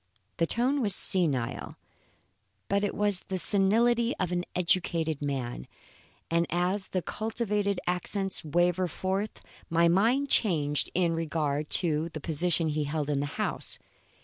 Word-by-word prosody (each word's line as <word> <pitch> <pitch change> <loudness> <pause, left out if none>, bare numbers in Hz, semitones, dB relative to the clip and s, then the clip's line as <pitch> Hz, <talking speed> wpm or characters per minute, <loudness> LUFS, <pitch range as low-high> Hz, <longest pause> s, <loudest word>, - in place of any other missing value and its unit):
The 165 - +1
tone 260 - +1
was 205 -5 +3
senile, 145 -11 +1 0.9
but 200 +1 +1
it 205 - -1
was 205 -2 +2
the 190 -1 -2
senility 230 +6 +3
of 180 -2 -2
an 175 0 -1
educated 170 -4 +1
man, 130 - -3 0.6
and 170 0 +2
as 180 +3 -1
the 185 -2 -2
cultivated 210 -3 -2
accents 190 +2 0
wavered 175 +3 +1
forth, 190 +6 -3 0.3
my 170 +1 +3
mind 230 +11 +3
changed 150 - +2
in, 175 -2 +2
regard 155 -2 -2 0.2
to 160 0 0
the 155 - -7
position 165 +2 0
he 150 0 -1
held 150 0 -2
in 140 - 0
the 145 - -1
house. - - -3
175 Hz, 140 wpm, -28 LUFS, 155-200 Hz, 0.9 s, was